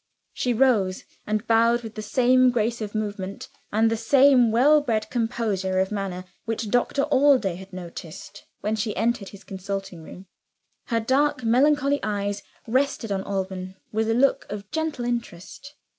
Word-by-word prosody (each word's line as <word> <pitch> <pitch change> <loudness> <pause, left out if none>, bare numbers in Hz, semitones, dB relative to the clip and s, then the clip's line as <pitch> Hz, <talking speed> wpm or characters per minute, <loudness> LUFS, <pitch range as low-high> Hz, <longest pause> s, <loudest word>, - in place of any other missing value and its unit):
She 250 - -1
rose 220 -7 +2 0.2
and 215 +1 -1
bowed 230 +1 +3
with 225 -1 -8
the 215 - -6
same 255 +4 +4
grace 235 -1 -1
of 210 0 -5
movement, 205 -2 -4 0.2
and 220 +2 +3
the - - +1
same 255 +1 +5
well 280 +7 +5
bred 220 -6 -1
composure 220 -6 -1
of 190 +1 +1
manner, 195 -3 -4 0.2
which 225 -2 -3
Doctor 245 +3 +1
Allday 260 -8 +4
had 190 +1 -12
noticed 170 -3 -9
when 215 +1 -1
she 215 0 -2
entered 230 -4 0
his 200 0 -13
consulting 195 -2 -6
room. 180 +4 -11 0.6
Her 230 - +1
dark 265 +3 +1
melancholy 280 +4 +3
eyes 205 -1 -2 0.2
rested 255 -2 0
on 195 -1 0
Alban 190 -1 -4 0.2
with 220 +1 0
a 225 - +2
look 270 +3 +2
of 205 -1 -7
gentle 315 -6 -2
interest. 240 +3 -5
225 Hz, 160 wpm, -24 LUFS, 195-250 Hz, 0.6 s, same